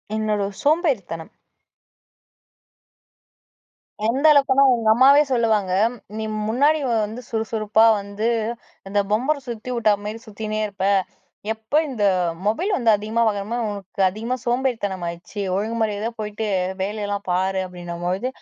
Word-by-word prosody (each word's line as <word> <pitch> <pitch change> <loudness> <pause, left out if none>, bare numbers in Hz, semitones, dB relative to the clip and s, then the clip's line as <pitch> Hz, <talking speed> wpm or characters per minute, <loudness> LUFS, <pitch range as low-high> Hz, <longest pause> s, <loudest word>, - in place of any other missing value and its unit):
என்னோட 210 -2 0
சோம்பேறித்தனம். 275 - 0 2.8
எந்த 265 +6 0
அளவுக்குன்னா 275 -1 +5
எங்க 225 -2 0
அம்மாவே 275 +5 +6
சொல்லுவாங்க. 215 -6 +1 0.4
"நீ 220 - -3 0.2
முன்னாடி 290 +7 +3
வந்து 220 +1 -1
சுறுசுறுப்பா 220 -1 +2 0.2
வந்து 200 +2 -3 0.6
இந்த 205 +1 +1
பம்பரம் 270 +5 0
சுத்தி 235 +2 -6
வுட்டா 220 -3 +3
மாரி 215 +2 -5
சுத்தினே 215 0 -4
இருப்ப." 195 -1 -4 0.7
எப்ப 220 +4 -20 0.2
இந்த 235 -6 -3 0.4
மொபைல் 345 - 0
வந்து 235 -3 +2
அதிகமா 215 +3 -2
வாங்கணுமோ 210 +3 -2
உனக்கு 200 0 -6
அதிகமா 225 +6 -3
சோம்பேறித்தனம் 235 -8 -1
ஆயிடுச்சு 170 +4 -6
ஒழுங்குமாரியாதைய 220 +1 -1
போயிட்டு 210 +1 -3 0.3
வேலையெல்லாம் 205 0 -3
பாரு 190 +1 +1
அப்டின்னும்போது. 180 +3 -4
220 Hz, 110 wpm, -22 LUFS, 200-240 Hz, 2.8 s, அம்மாவே